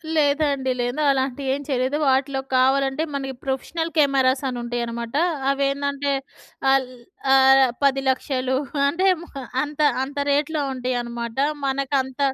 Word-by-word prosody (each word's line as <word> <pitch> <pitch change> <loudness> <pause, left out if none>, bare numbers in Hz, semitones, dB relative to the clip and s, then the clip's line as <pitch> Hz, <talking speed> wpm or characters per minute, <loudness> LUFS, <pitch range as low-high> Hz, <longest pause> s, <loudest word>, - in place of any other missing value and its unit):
లేదండి. 285 -3 +1
లేదు. 245 +5 -2
అలాంటివి 265 0 0
ఏం 280 - -3
చేయలేదు. 265 +1 0
వాటిలో 270 +1 +1 0.2
కావాలంటే 270 +3 +2
మనకి 270 -1 -3
ప్రొఫెషనల్ 325 +5 -3
కెమెరాస్ 275 -2 +3
అని 245 - -4
ఉంటాయనమాట. 235 0 -4 0.4
అవేందంటే 280 0 -1 0.6
ఆల్ 270 -2 +2 0.4
ఆహ్, 270 0 +6 0.2
10,00,000 265 -1 +1 0.3
అంటే 365 +6 +1 0.6
అంత 295 0 -8 0.2
అంత 280 +2 -7
రేట్‌లో 295 +1 0
ఉంటాయనమాట. 240 -2 -4 0.3
మనకంత 270 -1 -1
270 Hz, 105 wpm, -22 LUFS, 260-280 Hz, 0.6 s, ఆహ్